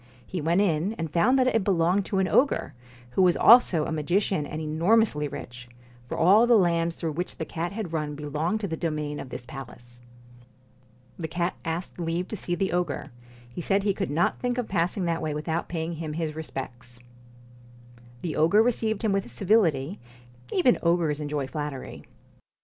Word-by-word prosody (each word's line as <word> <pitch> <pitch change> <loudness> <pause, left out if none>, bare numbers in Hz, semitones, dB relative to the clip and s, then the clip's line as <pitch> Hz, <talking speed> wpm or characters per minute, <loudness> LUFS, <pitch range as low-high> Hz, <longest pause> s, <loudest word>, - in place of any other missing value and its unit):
He 180 - -4
went 170 +5 +2
in, 180 +1 +1
and 165 -7 -5
found 230 +10 +4
that 260 - +3
it 225 -5 +2
belonged 185 +1 +2
to 195 - -1
an 190 -1 +2
ogre, 275 +8 +2 0.4
who 155 - +1
was 180 -2 +4
also 205 -10 +6
a - - -4
magician 160 +1 0
and 155 - -5
enormously 160 +1 +2
rich, 120 -3 -9 0.4
for - - -4
all 200 +8 +5
the 240 - +6
lands 170 -3 +2
through 165 - -3
which 175 +4 -4
the 160 - -3
cat 170 +3 -4
had 200 -5 -5
run 150 -2 -2
belonged 155 +8 -2
to 200 - -2
the 165 - -3
domain 150 -3 -3
of 130 - -7
this 120 - -7
palace. 120 -3 -11 1.2
The 160 - -3
cat 175 +1 -2
asked 170 +2 -4
leave 170 +2 -2
to - - -4
see 175 -3 -3
the 190 +2 -1
ogre. 175 -4 -2 0.4
He 120 +9 -7
said 195 +3 +1
he 200 -1 +2
could 195 0 -3
not 165 +4 +1
think 245 0 -1
of 245 -3 -2
passing 180 +1 0
that 165 -1 -1
way 155 -2 -2
without 160 +2 -3
paying 165 0 -3
him 160 -1 -5
his 155 -1 -3
respects. 125 -6 -7 1.3
The 160 -4 -3
ogre 195 +8 +4
received 225 -2 0
him 220 - +2
with 195 -10 -1
civility; 175 - +1 0.5
even 260 -10 +3
ogres 170 -3 +1
enjoy 145 -2 -2
flattery. 145 -1 -6
170 Hz, 185 wpm, -26 LUFS, 150-195 Hz, 1.3 s, also